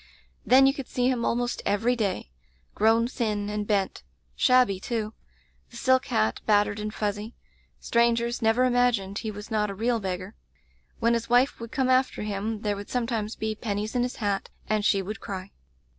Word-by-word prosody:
Then 265 +2 +6
you 270 - +4
could 275 -2 -7
see 250 0 0
him 245 -3 0
almost 240 +1 -1
every 225 +5 +1
day 200 - -2 0.2
— 65 0 -38
^grown 225 +2 +3
thin 210 -5 -2
and 210 -1 -3
bent; 200 - 0 0.3
shabby, 250 -7 +4
too; 220 +1 -3 0.6
the 235 - -11
silk 260 +2 +2
hat 110 +1 0
battered 205 -1 +3
and 210 0 -3
fuzzy. 210 +1 -3 0.4
Strangers 235 0 +1
never 225 +3 +3
imagined 245 -6 +1
he 220 - -4
was 210 +1 -8
not 210 -1 +1
a 200 - -5
real 230 +3 0
beggar. 185 0 -4 0.6
When 235 0 +2
his 230 0 -2
wife 245 +3 +3
would 230 0 -8
come 265 -3 0
after 255 -3 +2
him 210 +1 -3
there 205 -1 0
would 200 0 -8
sometimes 230 -3 -2
be 220 0 -2
pennies 210 0 -3
in 245 - +2
his 245 +1 -2
hat, 200 -3 -2 0.2
and 215 -1 +1
she 200 -1 +2
would 210 +4 -6
cry. 190 -1 -6
220 Hz, 185 wpm, -26 LUFS, 205-240 Hz, 0.6 s, Then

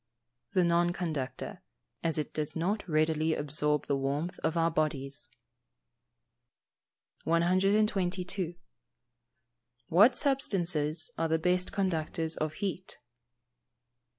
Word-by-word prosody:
_ - - -37
The 185 - +5
non 175 0 +2
conductor, 155 -8 -4 0.4
as 165 -1 +1
it 150 - -3
does 150 -1 -2
not 185 +4 -1
readily 155 0 +2
absorb 150 0 0
the 140 - 0
warmth 140 +6 -2
of 160 - -1
our 165 0 +2
bodies. 145 -3 -2 2.0
122. 185 0 +1 1.4
_What 210 +10 +6
substances 175 - 0
are 165 - +1
the 160 0 +2
best 180 +2 +1
conductors 165 -4 -1
of 155 0 -2
heat? 185 +1 -4
165 Hz, 100 wpm, -30 LUFS, 155-185 Hz, 2.0 s, What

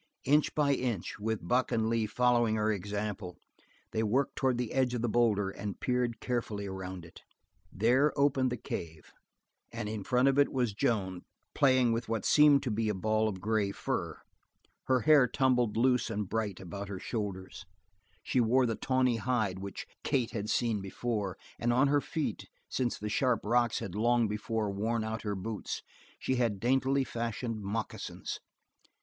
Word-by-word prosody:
Inch 145 +3 +3
by 145 -2 +3
inch, 120 -10 -2
with 110 -4 -3
Buck 125 +6 +2
and 110 -1 +1
Lee 115 -1 +1
following 120 0 +2
her 110 0 +1
example, 100 -2 -4 0.5
they 110 - 0
worked 125 +6 +1
toward 130 -3 +1
the 125 -2 -3
edge 130 -2 +1
of 120 - -2
the - - +2
boulder 105 -4 +2
and 100 0 -6
peered 125 -2 0
carefully 115 -5 -2
around 95 -2 -6
it. 80 - -14 0.5
There 125 +9 +3
opened 135 -2 +3
the 125 - -2
cave, 80 -7 -7 0.6
and 115 -2 -4
in 105 -1 -4
front 125 +5 +3
of 135 +1 +3
it 145 - +4
was 125 -5 0
Joan 100 -6 -1 0.3
playing 130 -3 +4
with 115 0 -3
what 115 -3 -1
seemed 150 -2 +6
to 125 - -1
be 110 +1 0
a 105 - 0
ball 110 +3 +1
of 95 -3 -6
gray 105 -1 0
fur. - - -3 0.7
Her 130 -1 +2
hair 145 -1 +6
tumbled 125 -4 +1
loose 125 +1 +3
and 105 -2 -2
bright 105 -2 -2
about 100 +2 -7
her 100 - -4
shoulders; 95 -4 -5 0.6
she 130 - +1
wore 125 +3 +3
the 115 - 0
tawny 130 0 +1
hide 110 -5 0
which 100 0 -6 0.2
Kate 125 -4 0
had 105 -1 -4
seen 115 -4 +1
before, 100 0 -3 0.2
and 120 - +1
on 130 +4 +4
her 145 0 +3
feet, 160 +1 -3 0.2
since 125 -2 -1
the 105 - -5
sharp 120 +2 +1
rocks 120 +2 +2
had 90 - -5
long 120 +2 +2
before 105 0 -2
worn 110 +3 -1
out 110 +1 -3
her 105 -2 -2
boots, 105 +3 -4 0.3
she 130 - -1
had 115 -5 +1
daintily 135 +3 +2
fashioned 115 -2 -3
moccasins. 105 +3 -4
115 Hz, 175 wpm, -31 LUFS, 105-125 Hz, 0.7 s, seemed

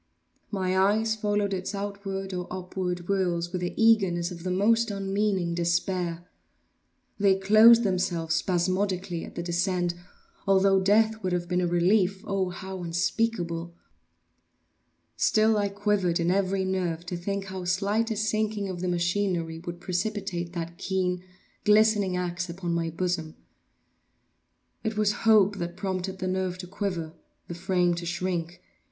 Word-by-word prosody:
My 185 -2 -1
eyes 215 +4 +3
followed 205 -1 0
its 190 +2 -3
outward 195 -1 -4
or 180 -1 -4
upward 180 -1 -3
whirls 175 -2 -1
with 180 -1 -3
the 175 - -3
eagerness 195 -6 +3
of 170 -1 -8
the 185 - -3
most 225 +5 +2
unmeaning 195 -3 -1
despair; 170 0 -1 0.9
they 200 -1 +4
closed 215 +4 +7
themselves 175 -4 0
spasmodically 185 0 0
at - - -10
the 170 - -3
descent, 175 0 0 0.5
although 195 0 +4
death 220 +3 +3
would 185 -2 -1
have 175 -1 -1
been 180 0 0
a 175 - +1
relief, 185 +2 +2
oh, 195 -2 0
how 190 +1 -7
unspeakable! 175 -1 -1 1.4
Still 220 0 +3
I 205 -1 +1
quivered 200 -4 0
in 170 +1 +1
every 190 0 +1
nerve 175 -3 -2
to 180 - -4
think 195 +3 -3
how 190 -1 -6
slight 200 +5 +1
a 220 - -1
sinking 215 -1 -1
of 180 -2 -5
the 185 - -1
machinery 175 -2 0
would 175 0 -7
precipitate 180 -1 -3
that 170 -1 -5
keen, 180 -2 -1 0.4
glistening 210 -3 +4
axe 175 0 -3
upon 175 0 -3
my 165 -1 0
bosom. 165 -1 -2 1.5
It 220 -1 -2
was 210 -1 +3 0.2
hope 205 -2 +5
that 175 0 -5
prompted 190 0 -3
the 185 0 -3
nerve 185 -1 -1
to 180 - -7
quiver—the 175 -4 -6
frame 180 0 +1
to 170 0 -5
shrink. 175 - -3
185 Hz, 145 wpm, -27 LUFS, 175-200 Hz, 1.5 s, closed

